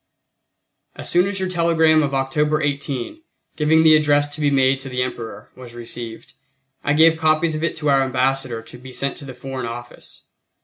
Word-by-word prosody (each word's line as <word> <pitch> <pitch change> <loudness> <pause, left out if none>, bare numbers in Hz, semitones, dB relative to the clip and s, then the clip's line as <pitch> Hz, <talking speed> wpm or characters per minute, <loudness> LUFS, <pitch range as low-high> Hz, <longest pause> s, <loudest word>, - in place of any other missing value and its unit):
As - - -5
soon 175 +2 +3
as 200 -1 -3
your 190 - -1
telegram 165 -3 +3
of 140 -2 -1
October 150 +3 0
18, 145 - -3 0.3
giving 160 +1 +3
the 160 -1 +7
address 145 -1 +3
to 155 - -6
be 145 - +3
made 135 -1 +2
to 135 0 -8
the 125 0 -1
Emperor, 115 -4 -7
was 125 -2 -12
received, 115 -1 -8 0.5
I 145 - +1
gave 160 +1 +5
copies 160 0 +2
of 155 +1 -3
it 170 - -1
to 150 -1 -2
our 135 -1 +4
Ambassador 130 -2 -1
to 115 - -13
be 130 +1 -11
sent 135 +3 -2
to 145 - -10
the 130 -2 -9
Foreign 130 -1 -6
Office. 120 +1 -9
140 Hz, 190 wpm, -21 LUFS, 130-155 Hz, 0.5 s, the